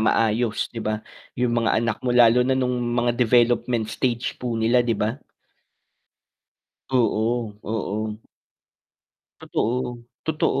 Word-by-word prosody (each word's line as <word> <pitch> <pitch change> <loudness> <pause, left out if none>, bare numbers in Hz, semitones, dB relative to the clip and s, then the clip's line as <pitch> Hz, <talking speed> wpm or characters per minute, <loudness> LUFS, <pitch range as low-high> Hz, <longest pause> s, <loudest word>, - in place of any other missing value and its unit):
maayos, 110 +1 +1
'di 115 - -5
ba, 110 0 -3 0.3
yung 125 -1 +1
mga 115 -2 +2
anak 115 -2 -2
mo, 125 -1 0
lalo 120 0 +6
na 130 - +2
nung 125 -1 0 0.2
mga 120 0 +2
development 120 -1 +2
stage 120 -2 -2
po 120 -2 -2
nila, 115 +2 +3
'di 115 -3 0
ba. 110 +7 -2 1.7
Oo, 115 -2 +1
oo. 110 0 -3 1.2
Totoo, 120 +1 -2 0.2
totoo, 155 -3 +1
120 Hz, 120 wpm, -23 LUFS, 110-125 Hz, 1.7 s, lalo